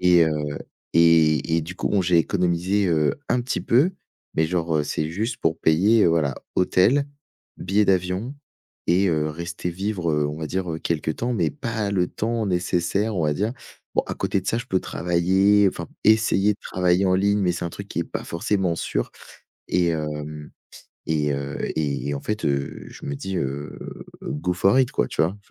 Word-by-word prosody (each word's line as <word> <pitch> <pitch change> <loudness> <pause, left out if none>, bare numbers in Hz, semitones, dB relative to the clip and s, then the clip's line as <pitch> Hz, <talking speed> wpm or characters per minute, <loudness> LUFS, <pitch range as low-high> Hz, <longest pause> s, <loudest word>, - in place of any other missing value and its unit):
Et 90 -2 +6
heu, 80 - 0 0.6
et 80 -1 +4
et - - +2
du 90 +4 -7
coup, - - -1
bon, 100 -2 +2
j'ai 85 -1 +3
économisé, 90 +3 +1
heu, 75 -3 +2
un 125 - +2
petit 125 - -2
peu, 145 +11 +3 0.4
mais 80 - +3
genre, 85 -3 0
heu, - - +2
c'est 75 +1 -2
juste 110 +8 -2
pour 80 0 0
payer, 100 +8 +4
heu, - - +5
voilà, 75 -5 +1 0.2
hôtel, 120 +10 +3 0.5
billet 100 +3 +2
d'avion, 95 +7 0 0.5
et 95 +3 +3
heu, 75 -2 +1
rester 85 +3 -5
vivre, 95 -2 -2
heu, 75 -1 +1
on 75 +2 -5
va 80 - -3
dire, 90 +1 -2
heu, 80 - -3
quelque 80 -2 -1
temps, 120 +10 -2
mais - - +1
pas 115 -8 -3
le 90 -3 +1
temps 115 0 -2
nécessaire, 90 +3 0
on 80 - +1
va 75 -1 +1
dire 105 +7 -1 0.4
bon, - - +4
à - - -4
côté 100 - -1
de 95 - -14
ça, 115 - +1
je 120 - -3
peux 95 - +1
travailler, 95 +4 +3
enfin 85 -3 -6 0.2
essayer 110 -2 +4
de - - -26
travailler 90 +1 +1
en 95 - +3
ligne, 100 +2 +2
mais 90 -2 +2
c'est 85 - -4
un - - -5
truc - - -8
qui - - -4
est - - 0
pas - - -5
forcément 90 0 -1
sûr. - - -2 0.6
Et 85 -2 +2
heu 75 -1 -5 0.6
et 75 -2 +1
heu, 70 0 -4 0.2
et 70 -1 -1
en 70 - -4
fait, 105 0 -3
heu, 70 -1 -2
je - - -11
me 70 - -3
dis, 95 +7 -4
heu,: 70 +2 -4 0.5
«go 75 +6 -2
for 95 +6 +3
it!» 125 - +1
quoi, - - 0
tu - - 0
vois? 85 +5 0
90 Hz, 200 wpm, -23 LUFS, 80-100 Hz, 0.6 s, Et